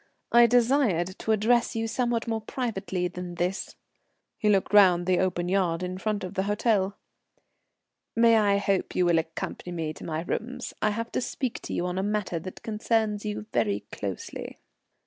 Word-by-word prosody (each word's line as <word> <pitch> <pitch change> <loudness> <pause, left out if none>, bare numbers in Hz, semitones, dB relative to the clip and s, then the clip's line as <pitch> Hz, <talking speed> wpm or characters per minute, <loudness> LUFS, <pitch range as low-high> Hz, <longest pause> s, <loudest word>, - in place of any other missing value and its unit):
I 235 0 +7
desired 235 - +2
to 220 - -1
address 235 +3 +2
you 225 0 -1
somewhat 235 0 -1
more 225 -1 -1
privately 200 -6 -2
than 175 0 -7
this." 180 +3 -2 0.6
He 210 - +2
looked 195 -1 +2
round 180 -4 +6
the 185 -1 +2
open 180 -2 0
yard 180 -2 +1
in 185 +1 -4
front 215 0 -1
of 185 +1 -5
the 190 - 0
hotel. 205 -2 +1 1.2
"May 230 0 +6
I 205 -2 +3
hope 200 -1 0
you 180 - +3
will 170 -1 +4
accompany 160 +2 -5
me 160 -3 -3
to - - -12
my 160 -1 -3
rooms? 250 +7 -4
I 215 - +3
have 230 +2 -3
to - - -1
speak 255 0 -3
to - - -6
you 175 - -1
on 180 +1 -2
a - - +1
matter 205 -4 -1
that 185 +3 -9
concerns 220 -1 0
you 210 0 -3
very 105 -3 +1
closely." 100 -3 -6
200 Hz, 180 wpm, -27 LUFS, 180-225 Hz, 1.2 s, I